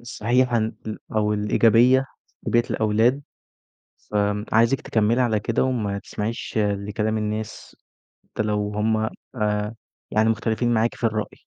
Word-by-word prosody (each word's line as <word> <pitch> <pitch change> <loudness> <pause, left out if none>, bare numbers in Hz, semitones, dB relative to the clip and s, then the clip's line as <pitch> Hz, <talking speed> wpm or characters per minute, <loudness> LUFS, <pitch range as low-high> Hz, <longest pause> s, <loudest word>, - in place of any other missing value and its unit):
الصحيحة 120 +1 +1
إن 110 0 0 0.4
أو 105 0 +2
الإيجابيّة 115 +5 +4 0.4
لتربيّة 120 0 +2
الأولاد، 110 +6 +2 0.9
فآمم 105 0 0
عايزِك 115 +4 +3
تكمّلي 115 +3 +1
على 110 -3 +2
كده 115 +2 0
وما 110 -6 -1
تسمعيش 110 +3 -5
لكلام 105 +1 0
الناس، 105 0 -4 0.5
حتى - - -3
لو 105 -1 -1
هُم 110 +1 +1 0.4
آآ 105 0 -1 0.4
يعني 110 +1 +3
مختلفين 115 +1 0
معاكِ 115 +1 +1
في - - -14
الرأي. 110 -1 -3
110 Hz, 125 wpm, -23 LUFS, 105-115 Hz, 0.9 s, الإيجابيّة